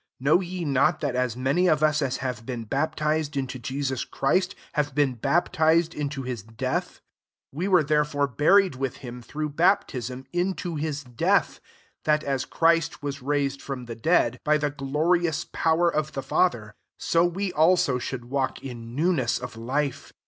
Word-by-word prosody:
3 130 - -12
Know 155 +6 +5
ye 180 -1 -4
not 135 -2 +2
that 140 -4 -1
as 125 -2 -1
many 140 +8 +2
of 155 -2 +3
us 155 0 +3
as 135 -2 -1
have 125 -3 -3
been 120 -1 -5
baptized 150 +3 -1
into 130 -1 -3
Jesus 130 0 -2
Christ, 185 +7 0 0.2
have 145 -2 -1
been 145 -3 +2
baptized 160 +5 +2
into 140 -2 -4
hi$^ 115 -3 -7
death? - - -1
4 - - -24 0.6
We 185 - 0
were 180 -5 +5
there 150 0 +3
fore 145 -1 0
buried 180 +7 +4
with 130 -1 -3
him, 125 0 -7
through 150 +5 -4
baptism, 130 - 0
into 175 -1 -1
his 150 -1 -3
death; 125 -3 +1 0.5
that, 150 0 +2
as 135 -2 -1
Christ 165 -2 +1
was 140 -1 -4
raised 140 0 -1
from 130 -3 -6
the 120 - -6
dead, 120 -2 +2
by 150 0 +3
the 145 -1 -1
glorious 155 +3 0
power 165 +1 +2
of 155 0 -1
the 135 - -4
Father, 120 -8 +1 0.2
so 165 0 +2
we 180 +2 -1
also 155 -5 +3
should 120 -1 -5
walk 135 +1 -2
in 120 -3 -8
newness 150 -6 +1
of 125 -2 -7
life. 130 +4 -3
145 Hz, 175 wpm, -25 LUFS, 130-160 Hz, 0.6 s, Know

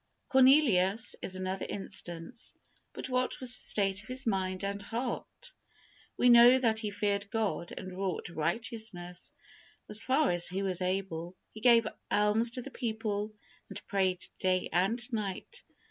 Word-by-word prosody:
Cornelius, 255 -7 +4
is 185 - -3
another 185 0 -3
instance, 180 +2 -5 0.4
but - - -6
what 255 0 -1
was 255 -2 0
the - - +4
state 195 -1 +2
of 215 - -13
his 255 +2 -2
mind 190 -3 -1
and 200 0 -3
heart? 240 - -5 0.6
We 250 - +3
know 240 +1 +8
that 225 -4 +2
he 215 -2 -2
feared 205 0 -1
God 215 -6 -2
and 185 -1 -7
wrought 190 -3 -3
righteousness, 180 +1 -4 0.6
as 210 +1 +3
far 265 +4 +2
as 175 0 +2
he 190 +2 -3
was 185 -2 0
able. 180 -2 -2 0.2
He 220 - -11
gave 235 -2 +6 0.2
alms 210 +3 +3
to 250 - -4
the 275 - -9
people, 215 -3 -3 0.3
and - - -6
prayed 190 -2 0
day 185 -1 +1
and 190 +7 +2 0.2
night. 210 - -3
205 Hz, 150 wpm, -31 LUFS, 185-235 Hz, 0.6 s, know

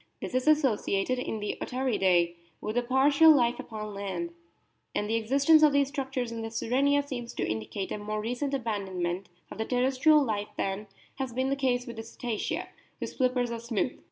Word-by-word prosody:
This - - -6
is 255 +3 0
associated 255 -6 +2
in 225 -3 -3
the 210 - -3
Otariidae 190 -10 +2 0.3
with 215 - -4
a 245 - +3
partial 280 +5 +5
life 240 -3 +2
upon 215 -2 -6
land, 190 -4 -4 0.6
and 210 - 0
the 220 - -1
existence 275 +8 +4
of 300 -2 +6
these 280 -1 +3
structures 265 -4 -3
in 230 -1 -5
the 225 - -4
Sirenia 275 +6 +2
seems 245 -4 -6
to - - -1
indicate 110 - -4
a - - -3
more 215 +1 -3
recent 250 +6 -2
abandonment 195 -6 -3 0.2
of - - -9
the 220 - 0
terres 255 +2 0
trial 305 +1 +6
life 210 -4 -2
than 195 +2 -2 0.3
has 265 -3 -3
been 260 +2 0
the - - +2
case 250 -2 0
with 235 -3 -8
the - - -3
Cetacea, 230 -1 -4 0.3
whose - - -5
flippers 250 -2 +1
are 230 - -3
smooth. 235 +1 -2
240 Hz, 190 wpm, -28 LUFS, 210-265 Hz, 0.6 s, of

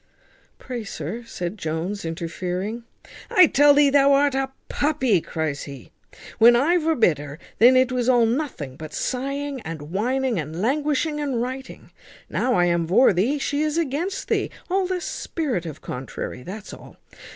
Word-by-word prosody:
"Pray, 245 -3 -6
sir," 200 +3 -6
said 180 0 -5
Jones, 165 +6 -3
interfering 180 +7 -4 0.4
"I 365 - +7
tell 290 -2 +5
thee 285 -1 +5
thou 280 0 +5
art 280 0 +3
a 270 0 -1 0.2
puppy," 260 - +1
cries 155 -3 -3
he. 140 -4 -11 0.5
"When 235 +2 +8
I 305 +9 +3
vorbid 250 - +2
her, 145 0 -8 0.2
then 250 +3 +7
it 255 0 +3
was 250 -1 0
all 240 -2 +5
nothing 225 - -3
but 155 -1 -8
sighing 275 +1 -3
and 160 -3 -7
whining, 250 +1 0
and 155 +2 -5
languishing 295 - 0
and 275 -5 -1
writing; 260 +2 -6 0.4
now 250 -1 +1
I 175 - +4
am 170 -1 +1
vor 200 +6 +5
thee, 225 +12 +1
she 285 +1 -1
is 305 +1 0
against 335 +5 -2
thee. - - 0 0.2
All 380 0 +1
the 365 -1 -2
spirit 255 - -3
of 155 -1 -8
contrary, 125 0 -6
that's 200 +8 -8
all. - - -13
240 Hz, 160 wpm, -23 LUFS, 175-280 Hz, 0.5 s, When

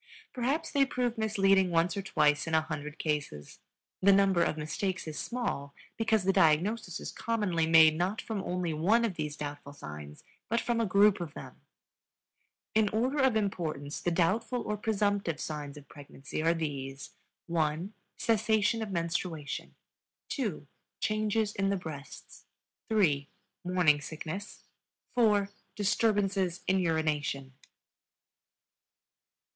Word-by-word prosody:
Perhaps 280 +6 -1
they 280 -1 +4
prove 250 -3 -1
misleading 195 -4 +3
once 170 0 +2
or 200 - -2
twice 150 -5 +2
in 165 - +1
a 160 - +5
hundred 150 -1 -6
cases; 145 - -3 0.4
the 200 +1 +6
number 195 -2 +4
of 155 - +1
mistakes 180 +4 -3
is 155 - -5
small, 200 - -3 0.2
because 220 -3 +1
the 195 +1 +2
diagnosis 180 +5 +2
is - - -6
commonly 205 -8 0
made 160 -1 +7
not 180 +6 -1
from 215 -3 -3
only 180 -3 -2
one 205 +10 +3
of 215 - -1
these 150 -3 -4
doubtful 145 -1 -6
signs 75 - -9 0.3
but 230 - +2
from 235 -1 0
a 225 - +1
group 200 0 +4
of 160 -3 -6
them. - - -10 1.1
In 215 -1 +3
order 250 +7 0
of 265 -4 +4
importance 165 -8 -2
the - - +1
doubtful 215 +8 +1
or 210 - -2
presumptive 205 -6 0
signs 150 -2 -5
of 145 - -13
pregnancy 140 0 -7
are 165 +1 +3
these: 140 -4 -5 0.3
(1) 165 +3 -1 0.2
cessation 220 0 +2
of 220 - -3
menstruation, 170 -3 -3 0.5
(2) 210 - -3 0.3
changes 215 0 0
in 195 0 0
the 200 - +1
breasts, 155 -6 -9 0.4
(3) 150 -10 +2 0.3
morning 175 -5 +3
sickness, 160 +6 -7 0.5
(4) 210 -5 +3 0.3
disturbances 200 -3 +1
in 190 0 +2
urination. 150 -5 -1
180 Hz, 135 wpm, -30 LUFS, 155-215 Hz, 1.1 s, made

